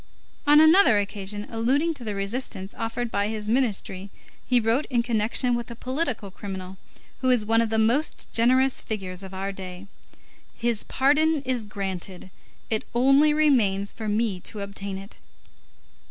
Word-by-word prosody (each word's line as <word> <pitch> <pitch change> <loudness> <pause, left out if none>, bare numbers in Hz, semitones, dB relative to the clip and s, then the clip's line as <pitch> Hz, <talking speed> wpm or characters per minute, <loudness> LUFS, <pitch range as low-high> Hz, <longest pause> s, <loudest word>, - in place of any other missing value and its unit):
On 295 +1 +7
another 315 - +7
occasion, 205 0 -3
alluding 265 +9 +1
to 265 - -11
the 210 -3 -4
resistance 195 -1 -3
offered 230 +1 -3
by 200 0 0
his 215 -1 -4
ministry, 210 -5 -1 0.4
he 250 -1 +4
wrote 230 +6 +1
in 240 -3 +1
connection 235 +1 +1
with 240 0 -3
a 235 - -7
political 255 - -3
criminal, 190 -1 -7 0.4
who 255 - 0
is 245 -4 +3
one 225 +1 +3
of 230 - 0
the 220 - 0
most 235 +8 0
generous 255 +3 +3
figures 190 -4 -5
of 190 -1 -9
our 195 +1 -4
day: 185 -1 -8 0.7
"His 235 -2 0
pardon 300 +2 +2
is 250 -4 -2
granted; 190 -2 -6 0.4
it 220 - +1
only 275 +5 +5
remains 230 -11 +2
for 220 -1 -5
me 210 -3 0
to 205 +3 -8
obtain 200 -1 -5
it." 195 +2 -11
225 Hz, 155 wpm, -25 LUFS, 200-255 Hz, 0.7 s, On